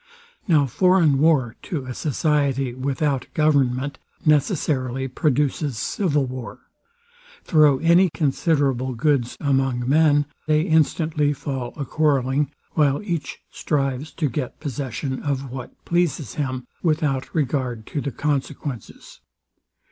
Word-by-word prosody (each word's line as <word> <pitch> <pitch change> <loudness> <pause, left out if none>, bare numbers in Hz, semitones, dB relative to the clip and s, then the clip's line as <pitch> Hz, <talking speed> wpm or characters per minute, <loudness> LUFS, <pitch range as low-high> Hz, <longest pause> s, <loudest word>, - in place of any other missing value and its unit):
Now 155 -6 +4
foreign 165 0 +3
war 140 -7 +3
to 155 -9 -4
a 130 - -5
society 140 -3 0
without 135 +1 -1
government 140 -3 +1 0.3
necessarily 140 - +1
produces 145 -1 0
civil 150 - 0
war. 130 -1 -7 0.8
Throw 150 -4 +4
any 170 +5 +4
considerable 140 -4 0
goods 130 -1 +1
among 135 -3 0
men, 145 0 +4 0.2
they 155 0 +3
instantly 155 -2 +2
fall 135 -3 -4
a 140 - -3
quarrelling, 140 -1 +1 0.2
while 145 -2 +2
each 170 -8 -4
strives 140 0 -2
to 155 - 0
get 130 0 -4
possession 130 -2 -4
of 135 -3 -3
what 130 -1 -9
pleases 170 - 0
him, 130 -4 -3 0.2
without 150 -5 0
regard 130 -6 -1
to 145 - -4
the 140 - -3
consequences. 140 -3 -4
140 Hz, 115 wpm, -23 LUFS, 130-155 Hz, 0.8 s, Now